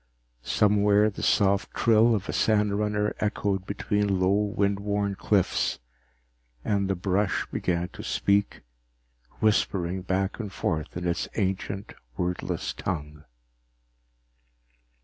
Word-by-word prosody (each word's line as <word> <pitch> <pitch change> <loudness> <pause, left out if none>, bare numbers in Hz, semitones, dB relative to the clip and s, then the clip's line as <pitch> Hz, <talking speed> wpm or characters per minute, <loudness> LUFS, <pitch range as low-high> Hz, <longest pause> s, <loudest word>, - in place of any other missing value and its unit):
Somewhere 105 - +3
the - - -8
soft 100 -1 +2
trill 115 0 +4
of 100 -1 -4
a - - -2
sandrunner 105 -1 +1
echoed 100 -2 -1
between 100 -1 0
low 95 +1 +3
wind 100 -1 +1
worn 100 0 -1
cliffs, 100 -1 +1 0.9
and 100 -2 0
the 95 - +1
brush 95 +2 0
began 90 0 -1
to - - -10
speak, 100 +1 0 0.8
whispering 95 -4 +1
back 95 +3 -1
and 105 -4 -5
forth 80 -3 -3
in 90 0 -3
its 85 - -1
ancient 95 -1 -2 0.2
wordless 90 0 -2
tongue. 75 -4 -5
100 Hz, 110 wpm, -26 LUFS, 95-105 Hz, 0.9 s, trill